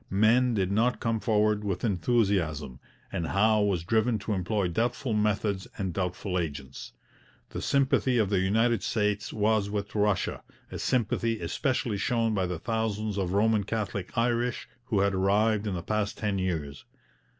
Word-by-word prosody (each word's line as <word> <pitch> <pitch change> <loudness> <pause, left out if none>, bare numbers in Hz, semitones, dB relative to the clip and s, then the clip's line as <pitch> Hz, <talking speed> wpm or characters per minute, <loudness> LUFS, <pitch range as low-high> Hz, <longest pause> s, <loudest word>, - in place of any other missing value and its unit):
Men 115 +5 +3
did 95 -2 0
not 115 +5 +2
come 115 -1 0
forward 105 -2 +1
with 95 -3 -3
enthusiasm, 90 - 0 0.3
and 85 - -2
Howe 110 +2 +3
was 100 -5 +1
driven 110 +4 +1
to 105 - -2
employ 95 +1 0
doubtful 120 +6 -1
methods 105 -2 0
and 95 -3 -2
doubtful 90 +1 -2
agents. 70 -5 -6 0.6
The - - -5
sympathy 135 -2 +2
of 105 -3 +1
the 100 - +3
United 110 +4 +2
States 105 -2 -1
was 105 -1 +1
with 100 0 -4
Russia, 105 -3 0 0.3
a - - -5
sympathy 115 -2 0
especially 120 -6 -1
shown 115 +1 +1
by 95 -3 0
the 90 -1 -3
thousands 110 0 -2
of 95 -1 -1
Roman 105 +1 +3
Catholic 100 -1 -4
Irish 120 +1 0 0.2
who 110 -6 +1
had 100 0 +2
arrived 105 +3 +2
in 100 - -2
the 85 - -4
past 105 -1 -1
ten 105 -3 -1
years. 80 -7 -3
105 Hz, 160 wpm, -28 LUFS, 95-110 Hz, 0.6 s, Men